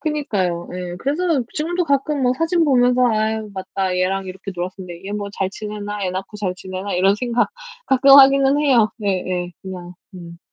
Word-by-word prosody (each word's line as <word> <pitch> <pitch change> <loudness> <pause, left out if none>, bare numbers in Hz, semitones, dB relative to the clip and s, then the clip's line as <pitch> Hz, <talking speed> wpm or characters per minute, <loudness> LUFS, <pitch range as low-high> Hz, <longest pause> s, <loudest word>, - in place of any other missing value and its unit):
그니까요. 200 - -2
예. 180 -1 -5
그래서 300 -1 0
지금도 345 +3 -1
가끔 280 -1 0
뭐 250 0 +3
사진 330 0 +2
보면서 250 -2 +3
'아유, 220 -1 -1
맞다. 190 -1 -3
얘랑 190 +1 0
이렇게 190 +1 -7
놀았었는데 180 0 -7
얘 200 - -6
뭐 205 -1 -4
잘 190 -1 -1
지내나? 210 -1 -5
애 180 - -1
낳고 195 +3 -6
잘 190 -3 -2
지내나?' 185 +2 -6
이런 195 +2 +3
생각 240 +1 0 0.4
가끔 270 +1 +4
하기는 275 +1 +6
해요. 245 -7 +3
네 200 -4 -1
예. 180 -1 -3
그냥 180 -2 -8 0.2
음. 170 -2 -10
205 Hz, 355 characters per minute, -20 LUFS, 185-270 Hz, 0.4 s, 하기는